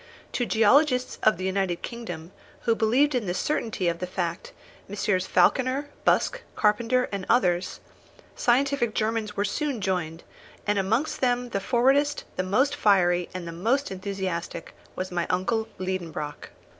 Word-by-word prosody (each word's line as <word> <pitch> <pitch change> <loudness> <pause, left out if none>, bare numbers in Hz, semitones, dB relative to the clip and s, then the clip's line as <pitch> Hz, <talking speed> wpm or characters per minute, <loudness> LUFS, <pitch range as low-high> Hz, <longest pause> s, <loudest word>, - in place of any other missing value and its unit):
To 245 - -1
the - - -10
geologists 250 +4 +3
of 215 - +4
the 185 - -5
United 190 -2 -1
Kingdom, 180 -9 -6 0.3
who 230 - +2
believed 250 +7 +3
in 240 -6 -1
the 175 - -1
certainty 220 -9 -1
of 170 0 0
the 180 - -3
fact 175 -1 -3 0.4
Messrs. 195 -2 0
Falconer, 265 +2 +2 0.2
Busk, - - +2
Carpenter, 230 +4 +2
and 200 -2 -3
others 180 -7 +2 0.5
scientific 250 -2 +1
Germans 215 -1 -1
were 205 - +1
soon 275 +4 -2
joined, 175 -4 -2 0.4
and 205 -1 +1
amongst 225 +11 0
them 245 -1 +1
the 200 - -1
forwardest, 270 +7 +2
the - - 0
most 255 +10 +1
fiery, 180 -7 +3
and 180 -2 -5
the - - -5
most 230 +12 0
enthusiastic, 185 -3 -4 0.2
was 185 0 -4
my 175 -1 -1
uncle 220 +5 0
Liedenbrock. 170 -5 -4
210 Hz, 150 wpm, -26 LUFS, 185-250 Hz, 0.5 s, of